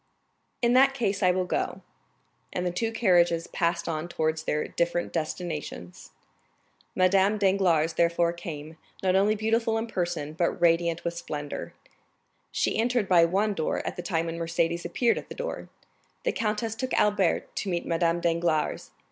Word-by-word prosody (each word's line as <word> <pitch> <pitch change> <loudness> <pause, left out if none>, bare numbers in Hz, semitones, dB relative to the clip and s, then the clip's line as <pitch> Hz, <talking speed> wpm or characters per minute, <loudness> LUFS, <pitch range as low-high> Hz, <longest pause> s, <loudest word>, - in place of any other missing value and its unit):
"In 235 0 +4
that 270 +1 +5
case 205 -6 -1
I 185 - +4
will 180 0 +1
go." - - -2 0.7
And 180 - -2
the 180 - 0
two 225 +6 -1
carriages 175 -6 +3
passed 170 -1 -1
on 160 0 -2
towards 160 -1 -1
their 150 -1 -1
different 170 0 -1
destinations. 155 - -5 0.9
Madame 195 +3 +3
Danglars 185 -5 +2
therefore 170 +1 +2
came, 160 -3 -8 0.3
not 185 -1 +3
only 205 +3 +3
beautiful 225 +1 +1
in 225 - -1
person, 175 -8 -3
but 170 +2 -1
radiant 170 0 +2
with 170 - -2
splendor; 145 -3 -6 0.8
she - - 0
entered 240 -2 +1
by 175 -3 +6
one 200 +5 +1
door 160 -5 -2
at - - -3
the - - -5
time 165 -3 -1
when 165 0 -4
Mercédès 170 +1 -1
appeared 235 +7 +1
at - - -13
the - - -7
door. - - -5 0.5
The - - +1
countess 220 0 -1
took 255 +3 -3
Albert 205 -4 +1
to 200 - -2
meet 175 -1 -2
Madame 170 0 +1
Danglars. 170 -2 0
175 Hz, 160 wpm, -27 LUFS, 165-205 Hz, 0.9 s, by